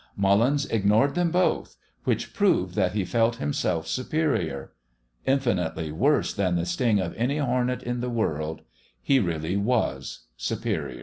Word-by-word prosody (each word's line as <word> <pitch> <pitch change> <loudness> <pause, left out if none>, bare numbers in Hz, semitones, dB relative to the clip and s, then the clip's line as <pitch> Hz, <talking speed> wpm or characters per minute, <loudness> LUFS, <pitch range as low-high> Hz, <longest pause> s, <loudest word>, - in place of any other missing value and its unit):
Mullins 115 +9 +3
ignored 110 +6 +2
them 175 -1 +1
both 180 +2 0 0.3
which - - -1
proved 185 - +2
that 95 -2 +1
he 100 -3 0
felt 115 +4 +2
himself 80 +1 -1
superior. 125 - -1 0.6
Infinitely 90 - 0
worse 135 - +2
than 95 -3 0
the 85 0 0
sting 105 +5 +1
of 90 -3 -2
any 125 +6 0
hornet 125 -2 0
in 120 0 -2
the 125 +1 -2
world: 80 -9 -2 0.4
he 135 - +4
really 85 -2 -1
was 110 - -1
superior. - - -3
110 Hz, 140 wpm, -26 LUFS, 90-130 Hz, 0.6 s, he